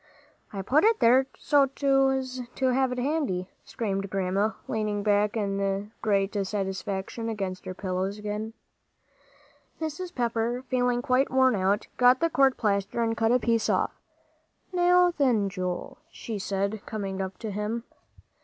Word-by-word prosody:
"I 195 -2 -5
put 280 +10 +3
it 450 +1 +4
there 255 +3 +5
so's 280 -2 +3 0.9
to 265 - +1
have 260 0 +2
it 250 - -3
handy," 250 - -1
screamed 195 -3 -3
Grandma, 195 +3 0
leaning 210 -2 -1
back 205 +1 +2
in 200 0 -1
great 200 -2 +1
satisfaction 195 +2 -3
against 195 -4 -4
her 185 - -5
pillows 190 +1 -2
again. 210 +1 -4 1.3
Mrs. 345 +3 -5
Pepper, 235 0 -1
feeling 245 -1 0
quite 255 +2 +2
worn 260 0 +4
out, 200 +1 +1
got 250 +1 +5
the 335 0 +1
court 270 -2 +3
plaster 200 +1 0
and 225 0 0
cut 225 0 +2
off 250 0 +2
a - - -4
piece. 230 -2 +2 1.0
"Now 355 0 +4
then, 230 -8 +3
Joel," 185 +7 -4
she 225 -9 -6
said, 200 +2 -2
coming 195 -3 -3
up 190 0 -5
to 220 -2 -5
him. 210 +3 -3
220 Hz, 145 wpm, -27 LUFS, 195-255 Hz, 1.3 s, there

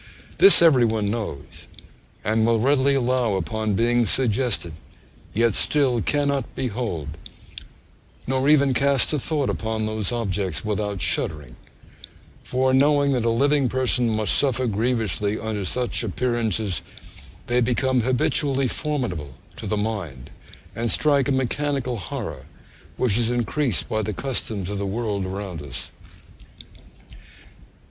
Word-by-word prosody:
This 390 - +8
every 140 -7 +6
one 110 -3 0
knows, 105 -11 -6 0.6
and 110 +2 +1
will 115 0 +2
readily 140 +3 +3
allow 125 -4 +1
upon 110 +2 -2
being 120 +1 +2
suggested, 120 -8 0 0.6
yet 115 +1 +2
still 130 -3 +2
cannot 140 +1 -1
behold, 110 - -3 1.2
nor 130 +2 0
even 140 -3 +4
cast 140 +1 +2
a 150 - +1
thought 145 0 0
upon 110 -1 -2
those 110 -2 -2
objects 100 -6 -2
without 105 -2 -2
shuddering; 75 -5 -1 0.9
for 130 +1 0
knowing 145 +1 +3
that 125 -4 0
a - - +3
living 140 +3 +2
person 125 -1 +2
must 110 -1 +2
suffer 130 -2 +2
grievously 110 -2 0
under 110 -2 -3
such 125 +6 -2
appearances, 110 -3 -1 0.6
they 120 +1 +1
become 125 +1 +1
habitually 135 +2 +1
formidable 120 - -3 0.2
to - - -6
the 105 - -1
mind, 100 - -4 0.4
and 115 0 -1
strike 140 0 +3
a - - 0
mechanical 130 -1 -1
horror, 90 -5 -6 0.5
which 120 -3 +1
is 115 -1 +1
increased 120 - -1
by 110 - -1
the 105 0 -3
customs 110 -4 -3
of 100 0 -4
the - - -2
world 100 -2 -2
around 95 -4 -5
us.' 65 -3 -7
115 Hz, 130 wpm, -23 LUFS, 105-130 Hz, 1.2 s, This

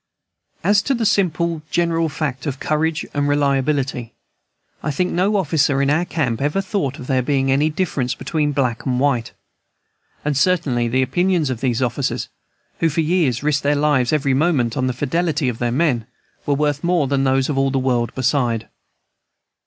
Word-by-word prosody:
As 205 0 +4
to 270 - 0
the 235 -2 -1
simple 170 -5 +1
general 165 -1 +1
fact 140 -1 -4
of 135 -1 -3
courage 155 +1 -1
and 145 0 0
reliability 140 -4 0 0.7
I - - -3
think 180 +5 0
no 190 +4 +1
officer 155 -6 +2
in 140 0 +2
our 165 +4 +2
camp 135 -10 -2
ever 145 +7 0
thought 190 -8 -2
of 125 - -8
there 130 0 +1
being 135 +1 +1
any 145 +3 +3
difference 150 -7 -1
between 150 +2 -1
black 130 -5 -1
and 125 -1 0
white. 125 -4 0 0.9
And 150 -1 0
certainly 140 -6 +1
the 130 +3 +1
opinions 170 +2 +1
of 120 - -5
these 130 -1 0
officers, 125 +2 -2 0.5
who 165 - +2
for 160 +2 0
years 155 -6 +1
risked 150 -1 +1
their 145 +1 +1
lives 145 -4 +2
every 140 -3 +1
moment 135 -5 +1
on 130 - 0
the 130 - -1
fidelity 150 +2 -1
of 115 - -5
their 120 -1 0
men, 125 -5 +1 0.4
were 145 - +2
worth 145 0 0
more 175 -3 +2
than 135 0 0
those 135 0 +2
of 150 - -2
all 135 0 +2
the 135 - -1
world 125 -3 0
beside. 125 -4 0
145 Hz, 180 wpm, -20 LUFS, 130-160 Hz, 0.9 s, As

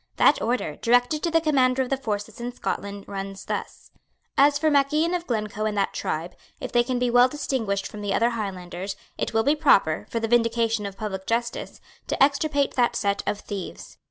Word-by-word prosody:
That 290 - +4
order, 230 -10 -1
directed 245 +5 +2
to 340 - 0
the 330 0 +4
Commander 265 -4 +3
of 255 - -8
the - - +4
Forces 215 -4 -4
in 240 +1 -3
Scotland, 200 -4 -4
runs 195 0 -6
thus: - - -5 0.4
"As 285 +1 +5
for 310 +1 +2
Mac 275 -1 +3
Ian 320 +3 +2
of 350 -1 -2
Glencoe 215 -2 -2
and 210 -1 -1
that 200 - +1
tribe, 165 +3 -3 0.2
if - - -5
they 240 - +4
can 250 0 -1
be 245 0 +1
well 245 +1 +6
distinguished 225 -9 -2
from 210 - -7
the 205 -1 -2
other 230 +4 +2
Highlanders, 195 -3 -5 0.2
it - - -1
will 225 - +4
be 285 +4 +3
proper, 200 - +3
for 230 - -1
the 225 - -1
vindication 230 -2 +2
of 195 -1 -9
public 190 -3 -5
justice, 235 +1 -2 0.3
to - - +3
extirpate 285 0 +2
that 245 -2 +2
set 200 -1 0
of 205 - -1
thieves." 195 -3 -7
230 Hz, 205 wpm, -25 LUFS, 200-270 Hz, 0.4 s, well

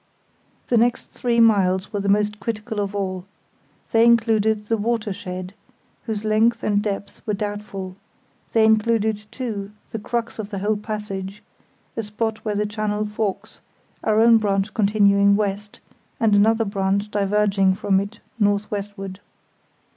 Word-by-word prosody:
The 240 - +3
next 240 +2 +1
three 235 -1 0
miles 195 -4 +3
were 205 - -1
the 200 0 -1
most 210 +1 +2
critical 220 -1 -4
of 200 0 -2
all. 185 -2 -3 0.7
They 225 0 +5
included 220 -2 +3
the 225 - +1
"watershed", 205 -4 -3 0.5
whose 220 -2 -3
length 220 +2 +2
and 205 -1 +2
depth 200 -1 -4
were 210 - +1
doubtful; 200 -2 -5 0.6
they 225 -1 +4
included, 220 -1 +2
too, 220 -5 -4 0.2
the 225 - -4
crux 235 +2 -3
of 210 -2 -4
the 200 - -5
whole 210 +3 0
passage, 210 -2 -5 0.5
a 225 - -1
spot 215 +1 -3
where 210 -2 -2
the 210 +1 0
channel 210 0 -2
forks, 210 0 -4 0.4
our 215 0 +2
own 230 0 +6
branch 200 -1 0
continuing 200 -1 +4
west, 205 0 -3 0.4
and 220 -2 +3
another 220 +2 +4
branch 200 +1 -1
diverging 200 -1 +2
from 195 -1 +2
it 205 +3 -6 0.2
north 205 0 +1
westward. 200 -2 -5
210 Hz, 145 wpm, -22 LUFS, 200-220 Hz, 0.7 s, own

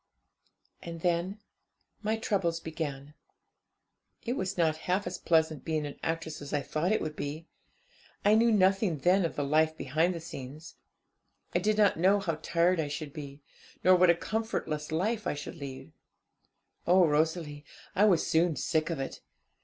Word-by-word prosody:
'And 165 -1 -7
then 175 +3 0 0.6
my 215 +1 0
troubles 185 -6 0
began. 150 -3 -5 1.1
It 240 - 0
was 190 -7 -3
not 160 -2 +2
half 190 +3 +1
as 175 0 -4
pleasant 160 -4 +2
being 155 -2 -1
an 145 - -8
actress 165 -1 -3
as 145 +1 -7
I - - +3
had - - -12
thought 165 +5 0
it 215 - +2
would 155 -1 -4
be. 150 +3 -5 0.8
I 205 - +6
knew 230 +2 +5
nothing 190 -3 +3
then 180 +6 +3
of 165 - -3
the 145 - -1
life 155 +2 +2
behind 160 +7 0
the - - -4
scenes. 150 +1 -9 0.8
I - - +3
did 210 +3 +1
not 205 -5 +4
know 195 +4 +4
how 165 -6 -2
tired 170 +2 +2
I 155 - 0
should 145 0 -5
be, 140 -1 -9 0.4
nor 185 0 +7
what 180 0 +5
a 170 - +6
comfortless 170 -8 -3
life 210 +7 -1
I - - -1
should 145 +3 -7
lead. 135 -3 -8 1.0
'Oh, 180 +1 +6
Rosalie, 150 -1 0 0.3
I 205 - +5
was 185 -6 +3
soon 165 -1 +2
sick 155 +4 0
of 165 - -3
it. 135 - -5
165 Hz, 170 wpm, -30 LUFS, 150-185 Hz, 1.1 s, nor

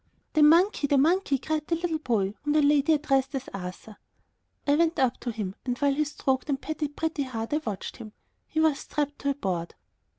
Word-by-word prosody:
"The 310 - +3
monkey! 330 +1 +5
the 285 - +3
monkey!" 320 0 +3
cried 305 +3 -3
the 335 - +1
little 335 -1 -2
boy, 210 -8 0
whom 295 0 0
the 305 - +4
lady 290 +2 +4
addressed 275 -2 +1
as 265 0 -4
Arthur. 195 +3 -7 0.7
I 285 - +3
went 330 +2 +2
up 260 -3 +1
to 240 - -3
him 210 -4 -4
and, 245 -1 -2
while 285 0 +2
he 305 +2 +1
stroked 270 -2 -1
and 275 -2 0
petted 300 -1 -4
Pretty 320 -2 -2
Heart, 235 -2 -4
I - - +3
watched 210 -5 -5
him. 220 -3 -9 0.4
He 315 - -2
was 315 -3 +3
strapped 290 -1 -3
to 280 - -1
a 280 - 0
board. 180 -9 -3
285 Hz, 210 wpm, -27 LUFS, 245-310 Hz, 0.7 s, monkey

